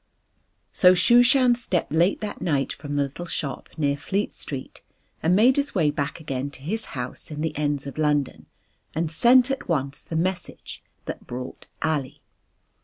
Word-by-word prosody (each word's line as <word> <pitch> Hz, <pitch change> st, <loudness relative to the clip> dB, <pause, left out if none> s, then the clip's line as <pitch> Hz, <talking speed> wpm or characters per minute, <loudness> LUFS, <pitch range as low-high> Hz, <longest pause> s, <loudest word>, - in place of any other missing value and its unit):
So 185 Hz, -1 st, +6 dB
Shooshan 245 Hz, +5 st, +5 dB
stepped 195 Hz, -11 st, -2 dB
late 170 Hz, +5 st, +2 dB
that 210 Hz, -, -5 dB
night 140 Hz, -5 st, 0 dB
from 145 Hz, -1 st, -6 dB
the 145 Hz, -, +2 dB
little 140 Hz, +6 st, -6 dB
shop 145 Hz, -4 st, -4 dB
near 140 Hz, -2 st, +1 dB
Fleet 195 Hz, +8 st, -2 dB
Street 135 Hz, -3 st, -6 dB, 0.4 s
and 170 Hz, +3 st, +3 dB
made 245 Hz, +7 st, +5 dB
his 285 Hz, -3 st, 0 dB
way 155 Hz, -6 st, +3 dB
back 145 Hz, +1 st, -3 dB
again 140 Hz, -3 st, -3 dB
to 135 Hz, -, -17 dB
his 220 Hz, +9 st, -2 dB
house 125 Hz, 0 st, -5 dB
in 150 Hz, -1 st, -5 dB
the 160 Hz, -1 st, -2 dB
ends 145 Hz, -2 st, -1 dB
of 140 Hz, +2 st, -7 dB
London 150 Hz, -2 st, 0 dB, 0.5 s
and 160 Hz, 0 st, -1 dB
sent 245 Hz, -, +5 dB
at 270 Hz, -, -4 dB
once 140 Hz, -4 st, -1 dB
the 160 Hz, -, -7 dB
message 180 Hz, +2 st, -3 dB, 0.2 s
that -, -, -7 dB
brought 125 Hz, +1 st, -7 dB, 0.2 s
Ali. 150 Hz, -5 st, -2 dB
160 Hz, 170 wpm, -24 LUFS, 140-195 Hz, 0.5 s, So